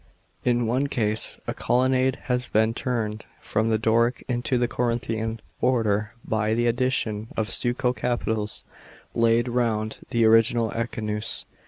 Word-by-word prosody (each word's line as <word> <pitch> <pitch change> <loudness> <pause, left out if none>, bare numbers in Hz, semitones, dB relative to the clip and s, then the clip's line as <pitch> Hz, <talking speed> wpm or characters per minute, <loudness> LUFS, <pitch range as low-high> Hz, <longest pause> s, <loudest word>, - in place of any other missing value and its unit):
In 120 -1 +2
one 130 +5 +1
case 110 -4 -1
a - - -2
colonnade 130 +1 +2
has 125 -2 -1
been 110 +1 +3
"turned 115 -4 -3
from 110 +1 0
the 110 - +3
Doric 115 +2 +2
into 125 +1 0
the 120 0 +2
Corinthian 115 -2 -1 0.2
order 110 -4 +1
by 110 0 0
the 120 +1 +1
addition 120 -3 0
of 110 - +1
stucco 125 +1 +1
capitals 110 -4 -1 0.5
laid 115 +1 +3
round 115 -3 0
the 115 -1 +3
original 115 0 +4
echinus." 110 -2 -3
115 Hz, 135 wpm, -25 LUFS, 110-125 Hz, 0.5 s, original